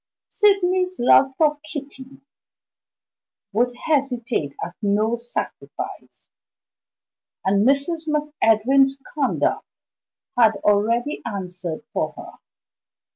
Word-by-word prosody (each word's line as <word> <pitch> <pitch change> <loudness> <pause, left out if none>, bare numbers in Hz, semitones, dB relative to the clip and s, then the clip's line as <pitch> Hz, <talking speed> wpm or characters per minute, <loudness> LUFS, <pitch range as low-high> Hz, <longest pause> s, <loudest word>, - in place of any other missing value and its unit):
Sydney's 370 -3 +2
love 265 +2 +5
for 300 -2 +2
Kitty 275 -3 -9 1.3
would 245 +3 +1
hesitate 245 - -1
at 175 - -9
no 215 +3 +1
sacrifice; 240 +1 -7 1.1
and 200 +3 +3
Mrs. 315 +4 +1
MacEdwin's 275 -3 +2 0.2
conduct 285 -5 0 0.7
had 225 -3 +5
already 230 +7 +1
answered 180 -3 -5
for - - -1
her. - - -9
255 Hz, 80 wpm, -22 LUFS, 220-295 Hz, 1.3 s, love